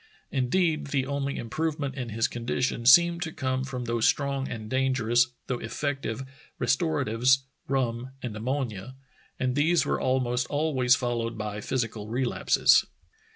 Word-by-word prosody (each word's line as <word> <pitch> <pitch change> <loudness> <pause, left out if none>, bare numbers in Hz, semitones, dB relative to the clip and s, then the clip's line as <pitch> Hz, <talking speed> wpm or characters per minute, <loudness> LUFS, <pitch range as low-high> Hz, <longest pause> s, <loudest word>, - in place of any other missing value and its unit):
Indeed, 155 +4 +1
the 140 -2 0
only 140 0 -2
improvement 150 +2 -2
in 125 -3 -5
his 115 +1 +1
condition 120 0 -2
seemed 170 +5 +7
to 165 -3 -3
come 130 -2 -2
from 130 -2 -5
those 115 -1 +1
strong 140 -1 0
and 110 -2 -6
dangerous, 130 -2 +2 0.2
though 125 -2 -2
effective, 135 -1 -3 0.4
restoratives, 130 -1 +2 0.2
rum 125 -2 -1
and 120 -4 -4
am 110 +2 -6
monia, 130 -4 -3 0.4
and 130 -1 0
these 160 +4 +3
were - - -1
almost 125 -1 0
always 140 -4 +2
followed 120 -2 -2
by 105 0 -4
phys 125 +3 -1
ical 110 -1 -9
relapses. 125 +2 +3
130 Hz, 145 wpm, -27 LUFS, 120-140 Hz, 0.4 s, seemed